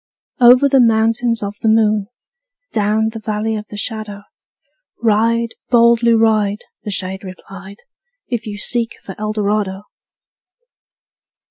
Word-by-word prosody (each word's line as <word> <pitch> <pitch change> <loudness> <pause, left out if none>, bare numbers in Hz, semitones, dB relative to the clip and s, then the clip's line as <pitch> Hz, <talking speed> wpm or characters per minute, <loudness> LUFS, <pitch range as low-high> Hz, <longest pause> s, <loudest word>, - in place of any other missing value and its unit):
'' - - -31
Over 255 +3 +5
the 275 -1 +3
Mountains 230 0 +2
Of 200 0 -5
the - - 0
Moon, 215 -2 +2 0.7
Down 215 +1 +1
the 225 0 -8
Valley 215 +1 -2
of 210 0 -6
the 210 - -9
Shadow, 210 -1 -5 0.8
Ride, 230 +1 +1 0.2
boldly 235 -1 +4
ride,'' 215 -2 +1 0.2
The - - -5
shade 190 -1 -3
replied, 195 +1 -11 0.5
``If 235 -2 -3
you 205 -1 -6
seek 230 +2 -1
for 190 - -7
Eldorado!'' 210 -2 -2
215 Hz, 125 wpm, -17 LUFS, 205-230 Hz, 0.8 s, Over